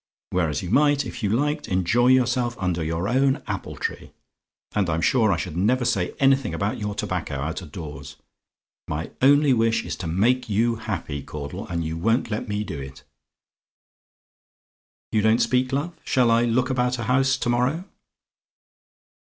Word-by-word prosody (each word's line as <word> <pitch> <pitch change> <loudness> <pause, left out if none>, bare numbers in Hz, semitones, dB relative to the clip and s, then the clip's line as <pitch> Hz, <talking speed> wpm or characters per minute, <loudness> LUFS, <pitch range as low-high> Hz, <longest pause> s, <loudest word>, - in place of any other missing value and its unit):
Whereas 80 -5 0
you 90 - -5
might, 145 +2 +3
if 120 +1 -7
you 105 - 0
liked, 145 +7 0
enjoy 95 +7 +2
yourself 125 -1 +2
under 90 -3 -1
your 80 +4 -2
own 135 +3 +2
apple - - -5
tree, - - -5 0.6
and 100 -4 +1
I'm 80 0 0
sure 110 +3 +3
I 90 - +1
should 85 -2 -5
never 120 +8 +2
say 90 -6 0
anything 135 -4 +3
about 100 +3 -2
your 105 -1 -3
tobacco 95 -8 -3
out 75 +7 -3
of 80 -5 -11
doors. 75 -5 -8 0.7
My 75 +2 -4
only 145 +1 +5
wish 115 -1 +1
is - - -4
to 90 - -5
make 120 +9 +1
you 115 +3 +1
happy, 95 -10 -4
Caudle, 75 +9 -7
and 85 -4 -3
you 80 +1 -3
won't 115 +6 +1
let 105 - -3
me 105 0 -2
do 80 -8 -6
it. 65 0 -10 2.1
"You 110 - +2
don't 110 +2 +4
speak, 130 +1 +1
love? 145 +6 -1
Shall 125 -3 +2
I 115 +1 +4
look 125 +3 +1
about 125 -1 +1
a 115 - -4
house 130 +3 +2
to 120 - -2
morrow? 125 +8 +1
110 Hz, 170 wpm, -24 LUFS, 90-125 Hz, 2.1 s, only